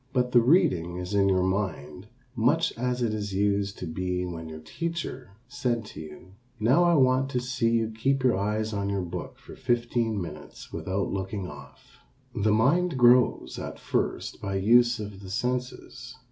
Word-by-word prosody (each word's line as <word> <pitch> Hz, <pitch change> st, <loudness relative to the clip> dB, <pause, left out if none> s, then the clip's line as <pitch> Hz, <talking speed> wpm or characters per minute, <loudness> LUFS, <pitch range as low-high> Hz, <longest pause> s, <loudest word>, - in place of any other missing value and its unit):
But 125 Hz, -1 st, +1 dB
the 120 Hz, -, +6 dB
reading 115 Hz, -, +3 dB
is 90 Hz, +2 st, -5 dB
in 100 Hz, -1 st, +3 dB
your 95 Hz, -1 st, +2 dB
mind 95 Hz, -3 st, -3 dB, 0.3 s
much 145 Hz, +8 st, +2 dB
as 125 Hz, +1 st, -1 dB
it 110 Hz, -2 st, 0 dB, 0.2 s
used 100 Hz, 0 st, 0 dB
to -, -, -5 dB
be 90 Hz, +2 st, -2 dB
when 80 Hz, -2 st, -6 dB
your 80 Hz, -, -7 dB
teacher 130 Hz, -, -5 dB
said 120 Hz, -2 st, -2 dB
to -, -, -8 dB
you, 90 Hz, +4 st, -12 dB, 0.3 s
"Now 130 Hz, +11 st, +4 dB
I 170 Hz, -1 st, +4 dB
want 130 Hz, -1 st, +3 dB
to 125 Hz, -, -1 dB
see 125 Hz, -1 st, 0 dB
you 115 Hz, -1 st, +1 dB
keep 135 Hz, +4 st, 0 dB
your 125 Hz, -2 st, +4 dB
eyes 105 Hz, +3 st, -1 dB
on 100 Hz, -1 st, -2 dB
your 100 Hz, -2 st, -1 dB
book 85 Hz, -, -6 dB
for -, -, -13 dB
fifteen 120 Hz, -2 st, 0 dB
minutes 90 Hz, -, -9 dB
without 95 Hz, +1 st, -2 dB
looking 95 Hz, 0 st, -3 dB
off." 70 Hz, -3 st, -14 dB, 0.3 s
The 105 Hz, +1 st, +1 dB
mind 140 Hz, +9 st, +2 dB
grows 125 Hz, 0 st, +4 dB
at -, -, -6 dB
first -, -, -2 dB
by 100 Hz, -1 st, -3 dB
use 120 Hz, +4 st, +4 dB
of 105 Hz, -2 st, -7 dB
the 95 Hz, -, -9 dB
senses. 125 Hz, +3 st, -4 dB
110 Hz, 175 wpm, -27 LUFS, 95-125 Hz, 0.3 s, the